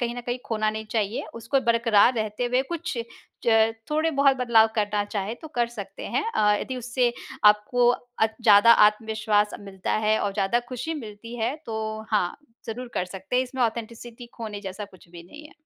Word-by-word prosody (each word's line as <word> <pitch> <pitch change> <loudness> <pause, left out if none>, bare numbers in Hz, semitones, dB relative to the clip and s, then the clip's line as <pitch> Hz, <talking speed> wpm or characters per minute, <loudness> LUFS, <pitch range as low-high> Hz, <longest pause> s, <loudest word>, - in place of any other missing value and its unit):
कहीं 240 -1 -1
न - - -4
कहीं 245 +1 -2
खोना 215 -1 -1
नहीं 220 0 -5
चाहिए, 215 -1 -1
उसको 230 +4 0
बरकरार 230 -1 +4
रहते 215 +1 -2
हुए 250 +2 +1
कुछ 330 -4 -4 0.5
च 225 -1 +4 0.2
थोड़े 310 +2 +1
बहुत 275 -2 +3
बदलाव 235 -3 +4
करना 205 -2 0
चाहें 205 +1 -4
तो 315 - -9
कर 240 -1 +2
सकते 200 -4 -9
हैं। - - -1
अ, 210 -1 +4
यदि 260 - -4
उससे 245 0 0 0.3
आपको 210 +4 +4
अ, 245 -2 -1 0.2
ज़्यादा 215 +1 +7 0.2
आत्मविश्वास 215 -1 0
मिलता 195 -2 -5
है 215 0 +3
और 205 - -1
ज़्यादा 200 +4 +1
खुशी 255 +6 -4
मिलती 230 -3 -8
है, 230 +4 0
तो 220 -1 -4
हाँ, 200 -5 +1 0.3
ज़रूर 245 +3 -5
कर - - 0
सकते 190 +5 -5
हैं, 255 - +4
इसमें 260 0 -3
ऑथेंटिसिटी 235 +1 -4
खोने 215 -3 -6
जैसा 195 +1 -6
कुछ 185 -3 -18
भी 170 0 -11
नहीं 295 - -13
है। - - -18
225 Hz, 190 wpm, -25 LUFS, 210-245 Hz, 0.5 s, ज़्यादा